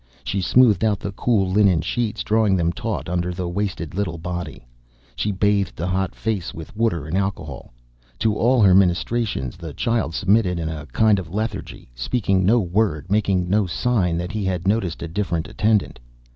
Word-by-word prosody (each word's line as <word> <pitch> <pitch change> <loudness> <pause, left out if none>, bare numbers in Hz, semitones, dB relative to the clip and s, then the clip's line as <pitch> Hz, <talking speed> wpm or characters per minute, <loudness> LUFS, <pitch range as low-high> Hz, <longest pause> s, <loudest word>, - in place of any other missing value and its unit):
She 100 - -2
smoothed 110 -1 +4
out 105 -3 +2
the 100 - -4
cool 105 -1 +1
linen 95 -4 +4
sheets, 110 +5 -2
drawing 110 -2 +2
them 85 -1 +1
taut 115 -1 -4
under 90 0 -1
the 90 0 -4
wasted 90 -3 -3
little 95 -3 -2
body. 85 -5 -6 0.5
She 105 - -1
bathed 100 -1 +1
the 85 - -3
hot 95 +1 -1
face 100 -4 -3
with 80 +4 -9
water 105 -9 0
and 80 +3 -3
alcohol. 95 -8 -3 0.5
To 110 +7 +1
all 120 +1 +3
her 95 -2 +6
ministrations 95 - +1
the 80 -4 -8
child 115 -8 -1
submitted 100 -3 +2
in 80 -1 -2
a 75 -2 -6
kind 110 -3 +3
of 85 -4 -7
lethargy, 105 - -5
speaking 95 - 0
no 115 +6 +4
word, 90 -4 -1
making 95 -4 +1
no 100 +1 +2
sign 90 -3 0
that 90 +2 -3
he 110 -1 -3
had 95 -1 -2
noticed 100 -6 0
a - - -4
different 85 -2 -2
attendant. 105 - 0
95 Hz, 180 wpm, -22 LUFS, 85-105 Hz, 0.5 s, her